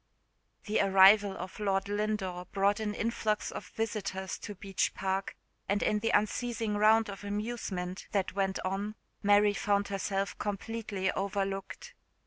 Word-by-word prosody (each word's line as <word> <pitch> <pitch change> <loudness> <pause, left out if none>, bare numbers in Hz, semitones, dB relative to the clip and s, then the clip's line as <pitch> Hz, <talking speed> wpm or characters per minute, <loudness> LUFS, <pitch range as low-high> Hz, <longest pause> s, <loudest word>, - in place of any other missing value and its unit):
THE 210 - +1
arrival 195 +1 +6
of 185 +3 -7
Lord 195 -1 0
Lindore 205 -3 -2
brought 200 +1 +2
a 215 -1 -1
influx 220 -1 -1
of - - -7
visitors 200 -4 -3
to 205 - -7
Beech 195 0 -1
Park; 190 0 -2 0.3
and 205 +1 +2
in 210 - +2
the 225 +2 0
unceasing 225 0 0
round 220 +2 +5
of 200 -1 -7
amusement 200 -3 -4
that 195 -2 0
went 195 0 0
on 200 +3 -2 0.3
Mary 205 0 +5
found 200 0 +1
herself 195 0 -2
completely 205 -2 -2
overlooked. 195 0 -3
200 Hz, 135 wpm, -31 LUFS, 195-210 Hz, 0.3 s, arrival